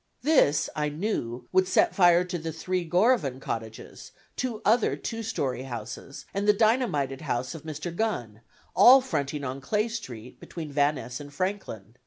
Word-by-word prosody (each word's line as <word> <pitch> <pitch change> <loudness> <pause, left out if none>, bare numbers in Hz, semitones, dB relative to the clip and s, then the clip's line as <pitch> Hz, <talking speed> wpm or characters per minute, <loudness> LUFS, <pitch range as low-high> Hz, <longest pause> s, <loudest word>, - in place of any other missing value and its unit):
This, 265 - +3
I 150 -1 0
knew, 135 - -3
would 185 0 +3
set - - +3
fire 175 -2 +5
to 180 -1 -4
the 160 +1 -4
three 175 +1 -3
Gorovan 175 - +2
cottages, 110 -3 -7 0.2
two 245 -4 -3
other 225 +1 +3
two 230 -1 -5
story 140 - -2
houses, 125 +1 -7
and 200 +1 -1
the 210 - +7
dynamited 210 - +1
house 125 +4 -2
of 160 - -8
Mr. 160 +3 -6
Gunn, 120 - -2 0.3
all 260 +2 +8
fronting 145 - -3
on 135 +1 -4
Clay 210 - 0
Street, 125 - -8
between 160 -4 -8
Van 145 +1 +2
Ness 125 -2 -6
and 145 -1 -10
Franklin. 145 - -4
160 Hz, 165 wpm, -27 LUFS, 135-210 Hz, 0.3 s, all